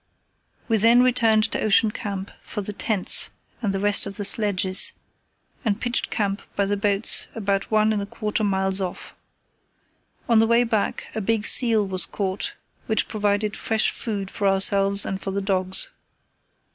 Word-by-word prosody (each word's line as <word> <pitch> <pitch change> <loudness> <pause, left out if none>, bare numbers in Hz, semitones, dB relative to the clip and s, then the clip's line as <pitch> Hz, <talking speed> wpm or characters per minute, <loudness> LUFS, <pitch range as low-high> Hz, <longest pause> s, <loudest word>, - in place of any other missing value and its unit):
We 225 - +2
then 230 +4 +5
returned 230 -4 +3
to - - -2
Ocean 215 +1 +3
Camp 200 -2 -6
for 210 - -6
the 210 - -4
tents 205 -2 +1 0.3
and 210 -4 -1
the 195 - -2
rest 205 0 +3
of 200 - -7
the 205 - -3
sledges, 195 -2 +3 0.7
and 215 -3 -1
pitched 245 0 -2
camp 200 -2 -2
by 200 - +1
the 205 +1 -1
boats 200 +1 +1
about 200 -3 -2
one 215 0 +2
and 205 - -2
a 200 - -6
quarter 215 +1 -3
miles 190 -1 +1
off. 180 -2 -6 1.1
On 230 -2 +4
the 225 - +3
way 235 +1 +3
back 220 -3 -2
a 220 - -3
big 215 +1 -1
seal 225 -4 +4
was 185 -2 +1
caught 195 0 -4 0.3
which 220 - 0
provided 205 -1 -1
fresh 220 -1 0
food 200 -4 -5
for 200 - -2
ourselves 195 +1 +3
and 195 0 -4
for - - -5
the 195 +1 -2
dogs. 190 -1 +1
205 Hz, 170 wpm, -23 LUFS, 195-220 Hz, 1.1 s, then